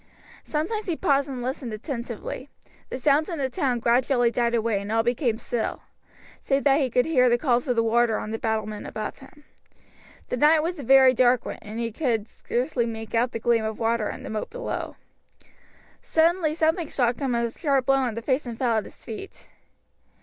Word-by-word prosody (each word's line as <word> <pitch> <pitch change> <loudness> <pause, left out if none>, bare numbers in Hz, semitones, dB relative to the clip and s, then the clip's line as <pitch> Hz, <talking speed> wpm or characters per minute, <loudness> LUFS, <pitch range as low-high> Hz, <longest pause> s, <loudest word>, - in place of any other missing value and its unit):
Sometimes 410 +9 -2
he 345 - 0
paused 280 -2 +1
and 255 -3 -5
listened 255 -1 -4
attentively. 235 +2 -6 0.4
The - - -4
sounds 290 +5 +2
in 335 - -3
the 265 -2 -2
town 250 0 0
gradually 245 0 +2
died 235 0 +1
away 225 -3 0
and 200 +1 -6
all 225 0 +2
became 240 -1 0
still, 235 0 -3 0.6
save 275 0 0
that 280 0 +4
he 265 - +1
could 245 +1 +2
hear 255 -6 +4
the 240 - +3
calls 245 -1 +1
of 250 - +1
the 230 - +3
warder 230 0 +2
on 215 - -5
the 225 - -3
battlement 215 -2 -2
above 215 - -5
him. 280 +2 -16 0.9
The - - -1
night 305 +4 +5
was 345 +1 -3
a - - -5
very 265 +1 +7
dark 250 -1 +3
one - - -6
and 215 +2 -7
he 230 -1 -2
could 225 -4 -1
scarcely 245 0 -2
make 225 -1 -6
out 235 +1 +2
the - - -3
gleam 230 0 +2
of 220 0 -3
water 225 -1 0
in - - -7
the - - -6
moat 215 -1 -3
below. - - -5 1.1
Suddenly 325 -1 +2
something 320 0 +1
struck 240 -2 0
him 265 -4 0
a 235 -1 0
sharp 275 -2 0
blow 270 0 +4
on 250 -5 -1
the 230 - -5
face 265 +1 0
and 235 -1 -6
fell 235 -3 +1
at 215 - -1
his - - -14
feet. 230 - -9
245 Hz, 205 wpm, -25 LUFS, 230-280 Hz, 1.1 s, very